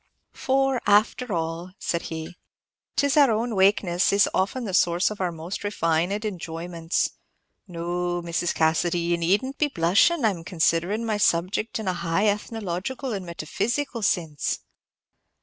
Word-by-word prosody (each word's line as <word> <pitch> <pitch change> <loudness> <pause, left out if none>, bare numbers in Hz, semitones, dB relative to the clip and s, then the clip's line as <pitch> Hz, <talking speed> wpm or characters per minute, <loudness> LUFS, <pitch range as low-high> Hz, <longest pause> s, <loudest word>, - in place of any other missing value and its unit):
"For, 270 -1 +1
after 215 +4 +3
all," 165 +1 -3
said 170 - -2
he, 160 +1 -6 0.6
"'tis 285 -1 +2
our 285 -3 +7
own 225 +2 0
wakenesses 190 -2 +3
is 200 0 +4
often 230 +6 0
the 195 - -4
source 175 +2 +3
of 210 - -6
our 180 -2 0
most 165 +3 -6
refined 190 +1 0
enjoyments. 170 -3 -2 0.6
No, 175 0 -2
Mrs. 170 +1 -1
Cassidy, 165 +2 +1
ye 170 0 0
need 185 +9 +2
n't 270 +1 -7
be 300 - +3
blushin'. 225 - +3
I 220 - +4
'm 170 -4 -7
considerin' 175 +5 0
my 215 -2 0
subject 190 +3 +1
in 220 -3 -5
a 185 - +1
high 175 +3 0
ethnological 215 +4 -3
and 190 -3 -5
metaphysical 235 - -2
sinse." 165 -7 -1
185 Hz, 150 wpm, -25 LUFS, 170-220 Hz, 0.6 s, our